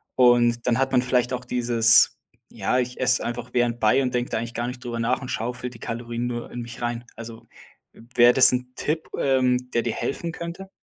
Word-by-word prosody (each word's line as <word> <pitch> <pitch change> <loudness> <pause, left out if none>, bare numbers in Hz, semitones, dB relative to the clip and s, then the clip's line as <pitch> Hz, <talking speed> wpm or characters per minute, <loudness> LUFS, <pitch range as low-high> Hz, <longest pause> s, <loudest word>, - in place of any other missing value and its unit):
und 120 -2 +3
dann 120 - +2
hat 135 +1 0
man 125 - +3
vielleicht 125 0 0
auch 125 0 -4
dieses: 120 -2 +4 0.3
„Ja 125 - -2
ich 125 0 -3
esse 125 -1 +2
einfach 120 +1 -5
während 120 -1 0
bei 120 +5 +3
und 125 -1 -2
denke 125 0 -1
da - - -2
eigentlich 115 +1 -5
gar 120 +1 -3
nicht 125 0 -8
drüber 120 -1 -5
nach 125 +4 0
und 125 - -7
schaufel 125 +2 -4
die 115 - -14
Kalorien 120 +1 -5
nur 120 -1 -6
in 120 - -6
mich 120 0 -9
rein.“ 120 0 -3
Also 115 -1 -10 0.7
wär 120 0 +7
das 130 - +8
'n 125 0 -3
Tipp 155 +2 -3
ähm, 125 -2 +1
der 120 - +2
dir 115 - -2
helfen 170 +4 -4
könnte? 170 +3 -8
120 Hz, 215 wpm, -23 LUFS, 120-125 Hz, 0.7 s, das